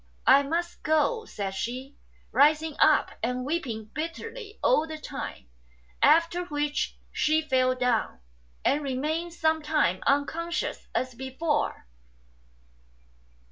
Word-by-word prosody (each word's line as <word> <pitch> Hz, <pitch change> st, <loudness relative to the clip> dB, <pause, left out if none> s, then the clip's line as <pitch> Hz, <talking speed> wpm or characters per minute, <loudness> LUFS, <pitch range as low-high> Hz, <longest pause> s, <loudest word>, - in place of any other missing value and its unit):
" -, -, -34 dB
I 275 Hz, +2 st, +7 dB
must 335 Hz, +5 st, -2 dB
go," 440 Hz, +9 st, +1 dB
said 200 Hz, -, -4 dB
she, 255 Hz, +7 st, -5 dB, 0.4 s
rising 305 Hz, +1 st, +4 dB
up 310 Hz, -1 st, +5 dB
and 250 Hz, +2 st, -1 dB
weeping 235 Hz, -9 st, -3 dB
bitterly 415 Hz, -, -6 dB
all 320 Hz, -11 st, +3 dB
the 315 Hz, 0 st, -6 dB
time; 290 Hz, -, -7 dB, 0.5 s
after 335 Hz, +4 st, +4 dB
which 295 Hz, -2 st, -2 dB
she 310 Hz, +1 st, +2 dB
fell 255 Hz, -3 st, +2 dB
down, 250 Hz, -, 0 dB, 0.5 s
and 290 Hz, -, +3 dB
remained 305 Hz, +5 st, -2 dB
some 315 Hz, -1 st, +1 dB
time 295 Hz, -, +1 dB
unconscious 330 Hz, +5 st, -1 dB
as 255 Hz, 0 st, -1 dB
before. 265 Hz, -, -2 dB
300 Hz, 115 wpm, -27 LUFS, 260-330 Hz, 0.5 s, I